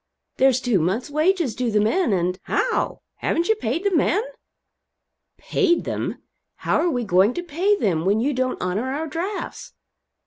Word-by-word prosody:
There's 260 -1 +4
two 245 -7 +1
months' 195 - -1
wages 315 - +1
due 245 +1 -1
the 210 -1 +2
men, 290 - +2
and 180 0 0
" - - -48
"How? 480 -3 0 0.2
Haven't 340 +3 -1
you - - +6
paid 295 - -2
the 400 -3 +1
men?" 370 +6 +2 1.1
"Paid 360 -6 +1
them! - - -4 0.3
How - - 0
are 350 - +2
we 245 -6 -1
going 200 +3 +3
to 350 - -3
pay 355 +5 +1
them 175 - 0
when 200 +4 +2
you 280 +5 +1
don't 255 0 -1
honor 205 +8 -2
our 300 +4 -2
drafts?" 345 +6 -5
260 Hz, 175 wpm, -23 LUFS, 210-345 Hz, 1.1 s, you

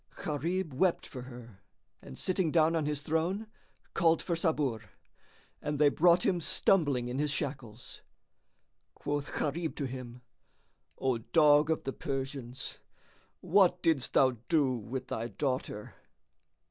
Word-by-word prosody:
Gharib 165 +1 -2
wept 175 +6 +1
for 130 - -8
her 120 -5 -11 0.4
and 65 - -11
sitting 185 -3 0
down 160 0 +3
on 155 -3 0
his 150 -1 -1
throne, 170 +8 -1 0.5
called 165 -1 +3
for 170 - -1
Sabur, 150 -9 0 0.8
and 150 0 -2
they 145 0 +5
brought 175 +4 +4
him 175 -2 +1
stumbling 145 -8 +2
in 125 +2 -3
his 150 0 +1
shackles. 130 -5 -5 0.9
Quoth 145 0 -3
Gharib 160 +2 -2
to 145 - -3
him, 125 -1 -7 0.7
"O 130 -3 0
dog 150 +4 +4
of 160 - 0
the 135 - -3
Persians, 135 -2 -5 0.6
what 180 -1 +3
didst 155 -6 +1
thou 130 -2 +4
do 145 -5 +3
with 125 +3 -5
thy 115 +1 -3
daughter?" 130 -5 -3
145 Hz, 135 wpm, -31 LUFS, 130-165 Hz, 0.9 s, they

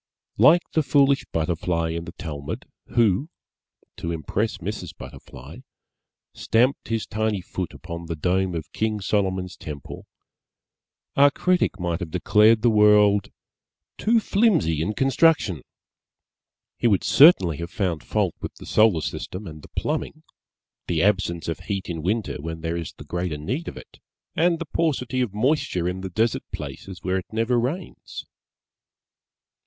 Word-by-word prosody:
Like 155 +10 +6
the 160 - +3
foolish 140 -1 +3
Butterfly 85 0 -1
in 85 0 -4
the 85 - -9
Talmud, 75 -5 -6 0.3
who 115 - +3 0.7
(to 85 - -4
impress 90 +8 -2
Mrs. 90 -2 -6
Butterfly) - - -11 0.8
stamped 125 +5 +1
his 115 -1 -1
tiny 110 -1 -1
foot 90 0 -5
upon 85 -1 -8
the 85 - -3
dome 90 +3 0
of 80 -1 -6
King 110 -1 -1
Solomon's 95 -2 -1
Temple, 75 -3 -9 1.1
our 140 +1 +7
Critic 180 - 0
might 85 -1 -1
have 85 -4 -5
declared 105 +6 +4
the 120 - +5
World 105 -1 +5 0.7
"Too 230 +2 +3
flimsy 195 - +2
in 105 +6 -2
construction." 135 - +2 1.2
He - - +3
would 100 -5 +2
certainly 95 - +6
have 85 +1 -5
found 90 -7 -2
fault - - 0
with - - -6
the - - -12
Solar 110 -7 +3
System 95 +6 -5
and 80 -3 -9
the - - -14
Plumbing - - -2 0.6
the 85 -1 +1
absence 95 -4 +1
of 80 - -3
heat 95 +1 -4
in 85 -2 -4
Winter 100 -2 -2
when 80 +1 -6
there 80 +1 -2
is 85 -2 -4
the - - -12
greater 90 -3 -3
need 130 - -4
of - - -6
it - - -13 0.4
and 170 +1 +3
the 165 - -5
paucity 135 -5 -1
of 120 -5 -1
moisture 105 - 0
in 90 +1 -3
the 95 - -5
desert 110 +5 0
places 95 -2 -8
where 95 +1 0
it 90 - -12
never 115 +2 +1
rains. 140 +11 -5
95 Hz, 150 wpm, -24 LUFS, 85-120 Hz, 1.2 s, our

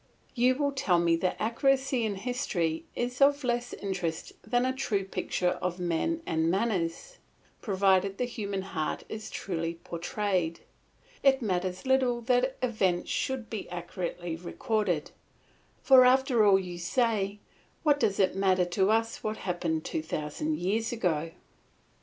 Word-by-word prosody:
You 255 +1 +3
will 285 +1 0
tell 265 -11 +2
me 170 -1 +3
that 180 +2 0
accuracy 265 +2 +1
in 210 -2 -1
history 190 - -2
is 245 +2 -3
of 285 +1 +5
less 240 0 -1
interest 180 -5 -4
than 245 +3 +1
a 260 - +1
true 220 -7 -1
picture 180 -1 -1
of 180 -1 -2
men 180 - -1
and 160 0 +1
manners; 195 - -1 0.4
provided 195 -1 +2
the 250 - 0
human 200 -5 -4
heart 155 -5 -3
is 215 0 -6
truly 170 -3 -3
portrayed, 175 0 -2 0.6
it 270 -2 +4
matters 185 -1 -2
little 260 -2 +2
that 250 +2 +1
events 190 -8 0
should 265 -4 -2
be 220 -3 -6
accurately 175 -1 -4
recorded; 190 - -2 0.7
for 260 -2 +8
after 255 -2 +4
all 195 -1 +7
you 180 -2 -5
say, 205 +1 0 0.5
what 290 -2 +4
does 200 -7 +1
it 190 -1 +3
matter 190 -2 +3
to 190 +3 +1
us 225 +1 0
what 215 0 -2
happened 170 -3 -2
two 160 - -2
thousand 150 -1 -3
years 210 +8 0
ago? 165 -9 0
200 Hz, 145 wpm, -29 LUFS, 175-245 Hz, 0.7 s, for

